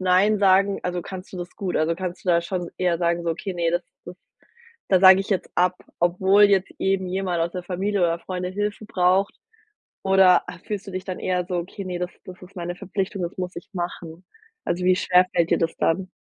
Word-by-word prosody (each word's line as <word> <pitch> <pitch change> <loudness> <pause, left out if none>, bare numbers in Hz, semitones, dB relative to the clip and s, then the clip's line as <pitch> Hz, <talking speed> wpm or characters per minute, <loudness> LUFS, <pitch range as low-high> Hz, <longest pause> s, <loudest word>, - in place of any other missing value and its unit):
Neinsagen 195 +1 +3
also, 180 -1 -2
kannst 185 -1 -9
du 185 - -7
das 175 0 -7
gut? 190 -3 -2
Also, 155 +2 +1
kannst 180 0 -5
du - - -4
da 170 -1 +4
schon 175 0 -4
eher 175 -2 +1
sagen 170 0 0
so: 165 - 0
„Okay, 185 +4 -4
ne, 170 -1 0
das 175 +1 0 0.2
das, 175 - -10 0.7
da 185 -2 +5
sage 190 0 +8
ich 195 - -4
jetzt 195 - -1
ab“, 180 +1 +2 0.2
obwohl 190 +4 +4
jetzt 195 -2 +4
eben 190 -1 0
jemand 180 -2 -1
aus 170 +1 -1
der 180 - -5
Familie 190 +2 -1
oder 170 -1 +1
Freunde 180 +1 -4
Hilfe 205 +2 -3
braucht? 185 0 +2 0.7
Oder 190 -2 +5 0.2
fühlst 210 -1 -5
du - - -7
dich 185 0 -5
dann 185 -2 -5
eher 180 -1 -1
so: 180 - -2
„Okay, 190 +3 -6
ne, 180 -1 -4
das 180 0 -2
das 180 -1 -11
ist 185 +2 -14
meine 175 0 -4
Verpflichtung, 195 0 -3
das 175 +2 -5
muss 180 0 -4
ich 170 - -9
machen“? 175 -1 -6 0.4
Also, 180 +1 -2
wie 185 0 +4
schwer 180 0 +4
fällt 170 -1 +1
dir - - +3
das 165 -1 -1
dann? 185 +3 0
180 Hz, 220 wpm, -23 LUFS, 175-190 Hz, 0.7 s, sage